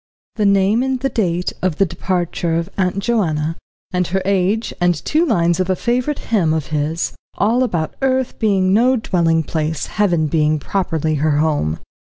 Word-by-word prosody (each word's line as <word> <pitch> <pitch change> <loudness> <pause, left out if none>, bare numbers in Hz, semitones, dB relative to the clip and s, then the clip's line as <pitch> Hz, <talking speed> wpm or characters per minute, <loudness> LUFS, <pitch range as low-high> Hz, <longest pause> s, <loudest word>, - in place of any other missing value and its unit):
The 210 -2 +2
name 200 +3 +3
and 260 0 -1
the 270 +1 -1
date 180 -7 -1
of 180 -4 0
departure 175 -2 -1
of 170 +3 -2
Aunt 185 -1 0
Joanna, 165 -9 0 0.4
and 180 -2 0
her 190 +2 -1
age, 200 +3 +1
and 175 0 +3
two 310 - 0
lines 175 - +2
of 185 0 0
a 185 - +2
favourite 250 +7 -1 0.2
hymn 165 -7 +3
of 155 -3 -2
his, 150 +3 -1 0.2
all 230 +5 +2
about 170 -11 -1
earth 260 -1 0
being 195 -3 +2
no 245 +5 +4
dwelling 170 -7 +1
place, 155 0 -2
heaven 175 -6 +1
being 155 0 +1
properly 160 0 -1
her 155 -1 +2
home. 145 - 0
180 Hz, 170 wpm, -18 LUFS, 160-215 Hz, 0.4 s, no